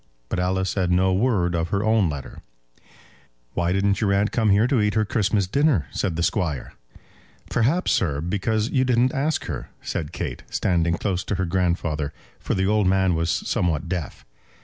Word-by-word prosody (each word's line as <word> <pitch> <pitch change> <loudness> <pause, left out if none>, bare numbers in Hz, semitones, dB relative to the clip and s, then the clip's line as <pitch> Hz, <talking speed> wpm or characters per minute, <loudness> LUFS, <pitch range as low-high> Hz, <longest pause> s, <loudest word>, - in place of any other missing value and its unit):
But - - -2
Alice 95 +1 0
said 95 -3 0
no 95 +1 +3
word 95 -4 +1
of 85 0 -1
her 100 +2 0
own 110 -5 +3
letter. 70 -3 -7 1.1
"Why 85 0 0
didn't 100 +2 +1
your 100 -2 +2
aunt 100 +2 +1
come 110 -3 +1
here 100 +3 +4
to 125 -3 +2
eat 105 0 +1
her 110 -1 +2
Christmas 100 -1 +1
dinner?" 135 - +2
said 90 -5 -2
the 85 - -1
Squire. 85 - -1 0.8
"Perhaps, 150 +11 +2
sir, 75 -6 +1
because 105 +6 -1
you 130 -2 +2
didn't 125 0 +2
ask 145 +3 -1
her," 75 -8 -5
said 75 0 -3
Kate, 85 - -5
standing 85 -2 +1
close 90 -2 -1
to 100 - -1
her 95 - -1
grandfather, 85 -5 -1 0.3
for - - -2
the 95 0 +1
old 105 -1 +2
man 95 -1 +3
was 80 0 0
somewhat 80 -3 0
deaf. 85 -7 -5
95 Hz, 180 wpm, -23 LUFS, 85-110 Hz, 1.1 s, here